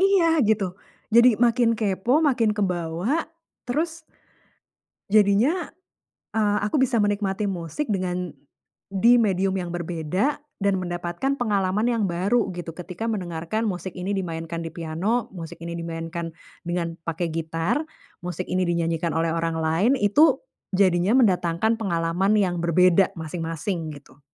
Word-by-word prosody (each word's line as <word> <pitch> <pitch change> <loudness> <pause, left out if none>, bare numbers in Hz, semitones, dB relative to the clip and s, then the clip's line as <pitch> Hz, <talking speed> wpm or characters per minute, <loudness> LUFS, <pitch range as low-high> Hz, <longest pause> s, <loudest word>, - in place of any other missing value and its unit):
Iya, 370 -4 +4
gitu. 210 -3 +2 0.4
Jadi 235 +3 +7
makin 235 -1 +4
kepo, 220 +7 +1
makin 245 -7 +3
kebawa, 180 - -1 0.4
terus 320 +5 -2 1.1
jadinya, 215 - +3 0.7
eee, 210 -1 +2
aku 260 +6 +1
bisa 245 -3 +2
menikmati 205 0 0
musik 180 - -3
dengan 180 - -2 0.6
di 225 +5 +5
medium 195 -2 +1
yang 180 -2 -3
berbeda 175 - -2 0.2
dan 200 -1 +1
mendapatkan 175 +11 -2
pengalaman 205 -2 +1
yang 230 -3 +1
baru 195 +7 +1
gitu, 175 -2 -6
ketika 180 +5 -6
mendengarkan 180 0 -2
musik 185 -1 -4
ini 180 +2 -4
dimainkan 165 -2 -4
di 165 - -8
piano, 185 +9 -1
musik 170 -3 -9
ini 170 0 -5
dimainkan 165 0 -5 0.3
dengan 170 -1 -2
pakai 165 +1 -2
gitar, 165 - -1 0.4
musik 180 0 -4
ini 185 0 +1
dinyanyikan 170 -1 0
oleh 165 0 +1
orang 165 0 -1
lain, 165 +10 +2
itu 255 +7 +4 0.3
jadinya 185 +1 +3
mendatangkan 185 +2 +2
pengalaman 180 0 +1
yang 185 -4 +2
berbeda 180 +2 +3
masing-masing, 165 0 -4
gitu. 140 -1 -16
185 Hz, 130 wpm, -24 LUFS, 170-220 Hz, 1.1 s, Jadi